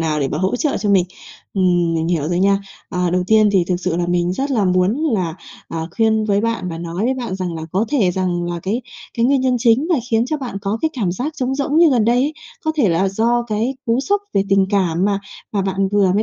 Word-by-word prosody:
nào 155 -2 0
để 135 - 0
mà 150 - -3
hỗ 190 +7 0
trợ 290 +2 0
cho 205 - -1
mình. 190 -3 +4 0.5
Ừm, 175 -3 +2
mình 160 0 -1
hiểu 160 -4 0
rồi 175 0 0
nha. 195 +1 +3 0.3
Ờ, 180 -2 -1
đầu 180 +1 +1
tiên 215 0 +5
thì 190 -3 +3
thực 180 - +1
sự 180 -1 -2
là 175 0 0
mình 175 0 +1
rất 270 +9 -2
là 225 -7 +2
muốn 185 +2 +2 0.2
là, 180 -6 -1 0.3
à, 165 -1 -4
khuyên 220 -1 +2
với 205 -1 +1
bạn 230 -4 -2
và 165 - -5
nói 170 +4 -3
với 260 +2 +1
bạn 240 -7 -4
rằng 185 -3 -3
là 160 - -5
có 195 +4 +1
thể 220 -10 +2
rằng 180 -1 -1
là 175 0 -4
cái 220 +6 -2 0.3
cái 235 - +1
nguyên 275 0 +3
nhân 255 -1 +2
chính 240 +6 +3
là 340 -5 +3
khiến 225 +1 +2
cho 305 +3 -1
bạn 245 -8 -5
có 205 +3 -1
cái 320 - +2
cảm 205 - -1
giác 260 +11 -3
trống 260 0 -1
rỗng 285 +2 -1
như 335 -2 +6
gần 240 -5 +3
đây 235 +2 +3
ấy, 275 +5 +1 0.3
có 315 - +1
thể 260 -9 +3
là 180 +3 +2
do 230 +5 +1
cái 235 +3 -2
cú 230 +2 +2
sốc 405 +9 0
về 195 - +3
tình 195 -1 +3
cảm 185 -4 +1
mà 200 -1 +1 0.3
mà 200 -2 0
bạn 195 0 0
vừa 200 -3 +3
mới 210 - +2
200 Hz, 265 wpm, -19 LUFS, 180-240 Hz, 0.5 s, như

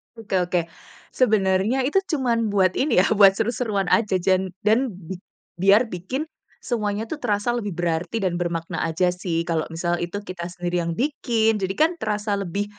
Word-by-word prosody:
Oke 225 -4 -4
oke. 180 0 +1 0.5
Sebenarnya 215 +1 +2
itu 345 +7 +3
cuman 235 -5 +1
buat 190 -2 +4
ini 265 -9 +3
ya, - - +2
buat 195 -2 +8
seru-seruan 215 -3 -1
aja 215 -4 +3
jan 185 0 +1
dan 220 +2 +2
bi 185 0 -8 0.4
biar 200 +6 +4
bikin 190 - -4 0.4
semuanya 215 -2 -2
tuh 315 - -4
terasa 205 +2 0
lebih 230 -4 -2
berarti 175 +4 -1
dan 185 -3 0
bermakna 170 -2 -3
saja 165 +3 +1
sih 175 -2 -2
kalau 165 -2 -1
misal 175 +1 -1
itu 175 +3 -3
kita 180 -2 -6
sendiri 175 0 -2
yang 170 0 -2
bikin, 235 -5 +1
jadi 190 0 -1
kan 315 +2 +4
terasa 210 -1 -1
lebih 200 0 -2
195 Hz, 170 wpm, -23 LUFS, 180-225 Hz, 0.5 s, buat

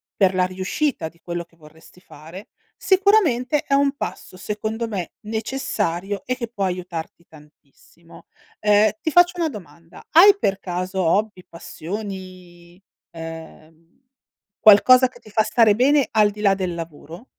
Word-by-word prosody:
per 190 -2 +2
la 185 0 +2
riuscita 185 - -3
di 170 - -28
quello 175 0 -5
che 165 - -30
vorresti 160 +3 -19
fare, 165 +5 -13 0.3
sicuramente 355 - +2
è 280 - -3
un 280 0 +2
passo 185 - -7
secondo 215 +4 -4
me 195 -6 -5
necessario 210 -4 -3
e 255 - -2
che 245 -2 -5
può 205 -4 -3
aiutarti 175 -2 -6
tantissimo. 155 +2 -20 0.4
Uhm, 210 0 +4
ti 315 - -2
faccio 350 +2 +4
una 330 -2 0
domanda: 170 - -13
hai 400 +5 +7
per 195 - -1
caso 185 +1 -4
hobby, 195 +2 0
passioni, 180 0 -9 0.3
uhm, 165 - -12 0.6
qualcosa 255 +5 +6
che - - -18
ti - - -17
fa 215 +1 +1
stare 215 -1 +3
bene, 270 +2 +3
al 210 -2 +3
di 210 +1 -10
là 200 -2 +4
del 185 -2 -3
lavoro? 165 - -9
195 Hz, 145 wpm, -21 LUFS, 170-235 Hz, 0.6 s, hai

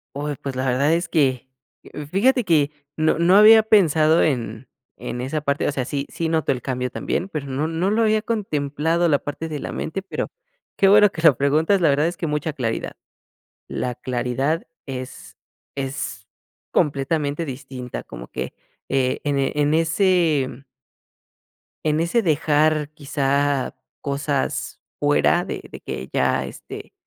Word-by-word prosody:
Uy, 145 +1 -3
pues, 135 -2 -4
la 130 +1 -1
verdad 140 +5 +2
es 170 +1 0
que, 130 -6 +1 0.6
fíjate 250 +6 +3
que, 155 -6 +2 0.3
no 155 0 +2
no 175 +3 +5
había 220 +1 +8
pensado 165 -7 +4
en 120 -4 -2 0.3
en 125 - -5
esa 135 +5 -2
parte 140 0 0
o - - +1
sea, 135 -3 -2
sí, 140 +2 -3
sí 165 - -3
noto 160 -3 +1
el 125 -2 -2
cambio 125 0 -2
también, 180 +8 -3
pero 150 -6 -4
no 135 +3 -1
no 165 +4 0
lo 220 +2 +2
había 215 -1 +3
contemplado, 165 -6 0
la 145 -3 +3
parte 145 +3 -5
de 155 -2 -5
la - - -5
mente, 195 +5 -4
pero 195 - -4 0.5
qué 195 - +4
bueno 210 +1 +7
que 160 - -6
lo 160 -7 +6
preguntas, 155 +8 +2
la 170 - +3
verdad 145 +3 +3
es 175 - -4
que 175 -4 -3
mucha 150 +1 -1
claridad. 120 -6 -3 0.7
La 125 - -3
claridad 130 +6 -2 0.2
es 130 -2 -8 0.4
es 135 0 -4 0.5
completamente 145 +1 0
distinta, 130 -3 -7
como - - -10
que, 65 0 -5 0.4
eh, 130 -1 0
en 145 -1 0
en 145 +2 +1
ese, 165 -3 +2
mm 130 +2 -11 1.2
en 155 0 +2
ese 170 +8 +2
dejar, 155 -3 +2
quizá, 140 -2 0 0.3
cosas 140 -1 -2 0.2
fuera - - +3
de - - -5
de - - -8
que 65 - -6
ya, - - +1
este, - - -10
150 Hz, 155 wpm, -22 LUFS, 135-165 Hz, 1.2 s, había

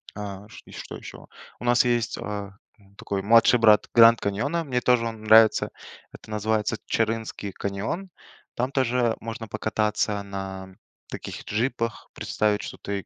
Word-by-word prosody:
А. 100 0 -7
Чт - - -14
и - - -14
что - - -8
еще? - - -11 0.3
У - - -8
нас 120 +1 +4
есть, 120 -1 0
а, 105 -1 -5 0.3
м, 100 -1 -24
такой 100 -1 -4
младший 115 +2 +5
брат 105 -2 +5
Гранд 115 0 +7
Каньона, 135 +12 -1
мне 130 -5 -1
тоже 125 -2 +3
он 110 -1 -7
нравится. 110 0 +6 0.4
Это - - -14
называется 110 +1 -1
Чарынский 110 -2 -2
каньон. 100 - -4 0.5
Там 125 +3 -1
тоже 125 -3 +1
можно 115 0 -7
покататься 105 -1 -1
на 95 -1 -7 0.3
таких - - -7
джипах, 115 +1 -2
представить, 105 -1 -1
что - - -7
ты 100 -2 -5
110 Hz, 150 wpm, -25 LUFS, 100-115 Hz, 0.5 s, Гранд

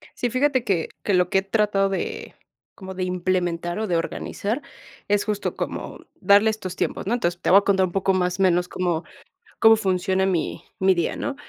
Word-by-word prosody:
Sí, 245 - -1
fíjate 260 +1 +1
que 190 -8 -1
que 205 - 0
lo 180 -1 +3
que 190 - +3
he - - -2
tratado 195 -1 +1
de 195 - -4 0.4
como 190 -1 -8
de 185 0 -3
implementar 175 -1 -1
o 220 - -2
de 175 - +1
organizar 205 - -3 0.5
es 205 0 +2
justo 210 -1 -2
como - - -5 0.2
darle 205 +2 +5
estos 190 -4 -4
tiempos, - - -2
¿no? 220 - +1
Entonces, 175 -7 -1
te - - 0
voy 190 - +8
a - - -4
contar 195 -2 +2
un - - -9
poco 195 +1 +1
más 180 0 0
menos 180 -2 +3
cómo 175 -3 -2 0.6
cómo 225 0 +7
funciona 190 -2 0
mi 180 -4 -1 0.2
mi 190 -1 +4
día, 170 -2 -1
¿no? 280 - -3
190 Hz, 200 wpm, -23 LUFS, 180-205 Hz, 0.6 s, voy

